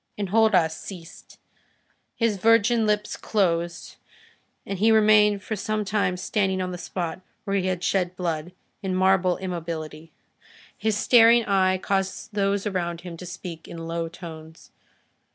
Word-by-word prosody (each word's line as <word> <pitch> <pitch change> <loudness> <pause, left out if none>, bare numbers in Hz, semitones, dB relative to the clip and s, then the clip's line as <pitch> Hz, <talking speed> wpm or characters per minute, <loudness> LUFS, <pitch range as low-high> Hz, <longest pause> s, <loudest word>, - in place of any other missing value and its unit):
Enjolras 200 -5 +2
ceased. 175 -2 -11 0.8
His 230 -3 +1
virgin 225 +2 +3
lips 210 0 0
closed; 170 -5 -1 0.7
and 195 -2 -5
he 220 +2 +4
remained 210 -2 +4
for 220 - -3
some 215 +1 -2
time 195 -2 0
standing 190 0 0
on 185 0 -2
the 180 - -6
spot 175 -1 -4 0.2
where 200 -2 -2
he 190 -1 0
had 185 -1 -2
shed 180 -2 0
blood, 170 -2 -3 0.3
in 190 -2 -2
marble 185 -1 +3
immobility. 165 -3 -6 0.6
His 220 -2 -1
staring 235 0 +6
eye 190 -2 +2
caused 195 +3 -2
those 200 0 0
about 175 -4 -2
him 175 -1 -8
to 180 - -9
speak 175 -2 -8
in - - -9
low 165 0 -3
tones. 160 -2 -11
190 Hz, 140 wpm, -24 LUFS, 175-210 Hz, 0.8 s, staring